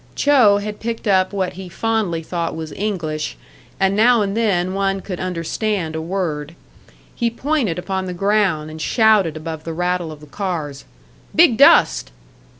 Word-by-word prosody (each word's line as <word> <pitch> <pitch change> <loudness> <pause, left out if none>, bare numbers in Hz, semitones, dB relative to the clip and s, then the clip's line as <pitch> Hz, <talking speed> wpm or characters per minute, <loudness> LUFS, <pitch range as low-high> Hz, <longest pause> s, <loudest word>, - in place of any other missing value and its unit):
Cho 255 -9 +5
had 210 +1 -5
picked 230 -1 -4
up 190 -2 +3
what 190 -2 -2
he 185 0 -9
fondly 205 -5 -1
thought 170 0 -3
was 160 -1 -6
English, 170 -7 -3 0.4
and 195 0 +2
now 230 +1 +4
and 200 0 -2
then 185 -5 +1
one 195 0 0
could 185 -2 -6
understand 180 0 -2
a 160 - -3
word. 165 -3 -3 0.6
He 235 - 0
pointed 250 - -1
upon 190 +1 -3
the 180 - -4
ground, 190 -6 +1
and 155 0 -8
shouted 210 - +3
above 160 0 -6
the 165 - -5
rattle 175 -1 -1
of 155 - -10
the 150 - -13
cars: 150 -4 -4 0.5
"Big - - +6
dust!" - - +5
185 Hz, 160 wpm, -20 LUFS, 160-210 Hz, 0.6 s, Big